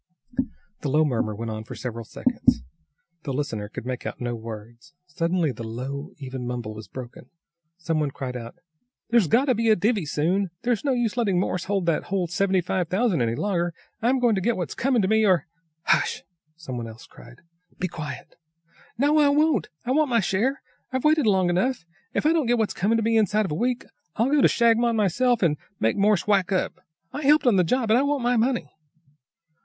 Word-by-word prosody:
The 145 - -3
low 155 +3 +3
murmur 115 -6 -1
went 115 +1 -4
on 110 0 -5
for - - -9
several 115 -2 -5
seconds. 60 - +1 0.6
The 145 - -5
listener 115 -7 -3
could 110 - -7
make 125 -1 -4
out - - -5
no 120 -1 -2
words. 115 +7 -9
Suddenly 170 -2 0
the 120 - -8
low, 135 +7 -5
even 130 -3 -6
mumble 120 -3 -4
was 110 0 -9
broken. 125 -1 -10 0.5
Some 165 -2 -1
one 150 -2 0
cried 130 -2 -6
out 115 -1 -7 0.6
"There's 235 -7 +4
got 240 - +3
to 260 - +3
be 230 0 +1
a 215 - +6
divvy 205 -4 0
soon. 180 +7 0
There's 240 -3 0
no 280 -2 +1
use 240 -2 -1
letting 200 -7 +2
Morse 185 -1 -1
hold 195 -2 0
that 165 -2 0
whole 190 -1 -1
seventy 185 +2 +1
five 180 0 -1
thousand 190 - +1
any 115 0 0
longer. 175 -1 -1 0.3
I'm 245 +4 +3
going 240 -3 +3
to 195 - 0
get 235 +4 +1
what's 175 -3 -3
coming 250 -4 +1
to - - +2
me, 220 +2 +3
or 185 -8 +3 0.2
" 160 0 -49
"Hush!" - - +1 0.3
some 130 -7 -6
one 115 -1 -4
else 115 +1 -11
cried. 120 - -16 0.4
"Be 185 - -1
quiet!" 150 -5 -7 0.6
"No, 290 +4 +3
I 290 -1 +5
won't! 290 - +2 0.2
I 250 - -1
want 300 +1 +3
my 235 -2 +3
share. 220 +8 0 0.3
I've 260 -1 -2
waited 305 -5 +4
long 190 -3 +3
enough. 185 +3 0 0.3
If - - 0
I 315 - +5
don't 315 -7 +1
get 240 +1 +3
what's 220 -2 0
coming 215 +5 +1
to 225 - 0
me 225 +1 +2
inside 215 0 +2
of 190 - -4
a - - 0
week, 245 +8 -1 0.3
I'll 235 +5 +1
go 295 -1 +4
to - - +7
Shagmon 235 0 +3
myself 225 +3 +2
and 150 -4 +2 0.2
make 110 - +2
Morse 205 -1 +2
whack 200 -3 +2
up. 190 - 0 0.4
I 295 - -4
helped 300 +1 +4
on 235 -6 +5
the 180 - +5
job, 230 +4 +1
and 235 - +5
I - - +3
want 285 -2 0
my 245 +1 +2
money!" 235 - 0
190 Hz, 215 wpm, -25 LUFS, 140-235 Hz, 0.6 s, to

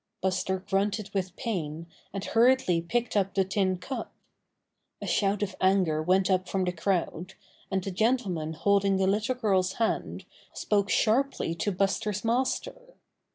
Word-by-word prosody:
Buster 190 0 0
grunted 200 +1 0
with 185 -2 -2
pain 170 - -3 0.3
and 195 0 -5
hurriedly 230 -7 +3
picked 235 +8 -2
up 195 -1 +1
the 195 -1 +3
tin 190 -1 0
cup. 260 +9 -6 0.9
A - - -6
shout 200 0 +1
of 190 -2 -4
anger 185 -5 +3
went 185 +3 +3
up 185 -1 +1
from 190 -1 0
the 180 - 0
crowd, 180 0 -2 0.3
and 190 -1 -1
the 195 - -4
gentleman 185 -7 0
holding 200 +3 +2
the 190 - +2
little 210 +6 +1
girl's 190 -6 +1
hand 225 -1 -2 0.3
spoke 200 -1 0
sharply 240 -5 +1
to 170 +5 -1
Buster's 200 +2 -1
master. 380 - -2
195 Hz, 150 wpm, -28 LUFS, 185-215 Hz, 0.9 s, hurriedly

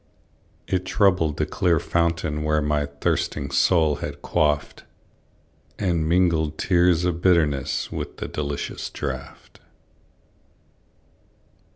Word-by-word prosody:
It 90 -1 -1
troubled 90 -8 +2
the - - +1
clear 85 -3 +1
fountain 85 -2 -1
where 75 0 +1
My 75 -1 0
thirsting 70 0 -2
soul 80 +1 +3
had - - -7
quaffed, 75 -1 0 0.9
And 85 -5 0
mingled 80 -3 +2
tears 90 -1 +3
of 85 -1 -1
bitterness 75 -7 +1
With - - -5
the - - -5
delicious 70 -1 -4
draught. - - -7
80 Hz, 100 wpm, -23 LUFS, 75-90 Hz, 0.9 s, soul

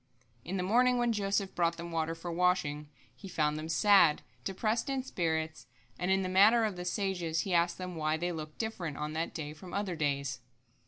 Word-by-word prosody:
In 190 +3 -3
the 180 - -1
morning 245 +6 +3
when 240 -1 +2
Joseph 200 -2 -1
brought 170 -1 +1
them 170 0 -6
the - - -8
water 165 0 -1
for 170 +1 -6
washing, 165 -4 +1 0.3
he 195 - -10
found 150 -4 0
them 155 +1 -5
sad, 170 -2 +5 0.2
depressed 215 +6 -1
in 270 -1 -1
spirits, 160 - -2 0.3
and, 180 +1 -1
in 190 0 +3
the - - -1
manner 205 +5 +5
of 210 -3 -2
the 180 0 -6
sages, 180 -4 -1
he 190 - -3
asked 170 0 +2
them 180 -1 -6
why 155 0 0
they 175 +2 -2
looked 155 -2 -7
different 180 -10 -4
on 150 +1 -3
that 160 +1 -2
day 150 -2 -5
from 175 +4 -9
other 200 -3 -1
days. 140 -3 -1
175 Hz, 210 wpm, -31 LUFS, 160-195 Hz, 0.3 s, sad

